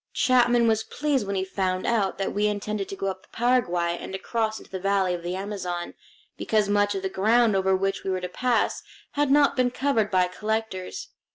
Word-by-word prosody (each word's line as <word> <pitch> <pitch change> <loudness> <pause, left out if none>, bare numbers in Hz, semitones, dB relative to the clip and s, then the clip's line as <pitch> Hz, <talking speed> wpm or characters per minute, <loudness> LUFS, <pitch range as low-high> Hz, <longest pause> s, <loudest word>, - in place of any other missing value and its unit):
Chapman 240 -2 +4
was 220 -1 +2
pleased 280 -7 -1
when 200 - -2
he 190 0 -1
found 185 -1 -2
out 215 -5 +1
that 195 - -2
we 210 +1 +1
intended 210 -1 -3
to - - -5
go 195 - -4
up 190 -1 -3
the - - -24
Paraguay 180 -9 +1
and 190 - -6
across 220 +2 -2
into - - -14
the 190 - -4
valley 195 -1 +1
of 175 - -4
the 175 +2 -3
Amazon, 185 -3 -4 0.4
because 215 -2 +1
much 205 0 +2
of 195 - -3
the - - +1
ground 220 +3 +3
over 190 0 +2
which 195 +1 -1
we - - -3
were 185 -1 0
to 180 - -3
pass 245 +6 0 0.3
had 290 -1 0
not 285 0 +4
been 255 -1 +2
covered 245 -4 0
by 185 -1 +3
collectors. 220 - -4
205 Hz, 210 wpm, -25 LUFS, 190-230 Hz, 0.4 s, Chapman